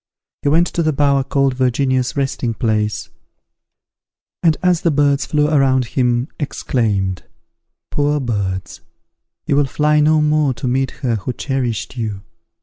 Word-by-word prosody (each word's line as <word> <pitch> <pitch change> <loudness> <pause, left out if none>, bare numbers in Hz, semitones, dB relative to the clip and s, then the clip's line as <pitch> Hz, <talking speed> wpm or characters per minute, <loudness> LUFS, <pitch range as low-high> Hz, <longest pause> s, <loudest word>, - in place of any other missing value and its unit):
He 145 - +1
went 165 +4 +4
to 175 - -2
the 155 -1 +1
bower 140 -1 +2
called 135 0 +1
Virginia's 130 +1 0
Resting 135 -4 -1
place, 110 -3 -1 1.3
and, 165 -3 +3
as 180 -2 +3
the 170 - +2
birds 145 -1 +2
flew 150 -1 +2
around 135 -4 +3
him, 125 0 +1
exclaimed, 105 - -1 0.7
"Poor 145 0 +1
birds! 100 -7 -3 0.6
you - - +1
will 145 0 +3
fly 150 +2 +2
no 155 +1 +4
more 150 -3 +2
to 115 +2 -4
meet 130 +1 +1 0.2
her 115 -3 +1
who 105 +5 -4
cherished 125 - -3
you!" 105 -4 -4
135 Hz, 145 wpm, -18 LUFS, 120-150 Hz, 1.3 s, went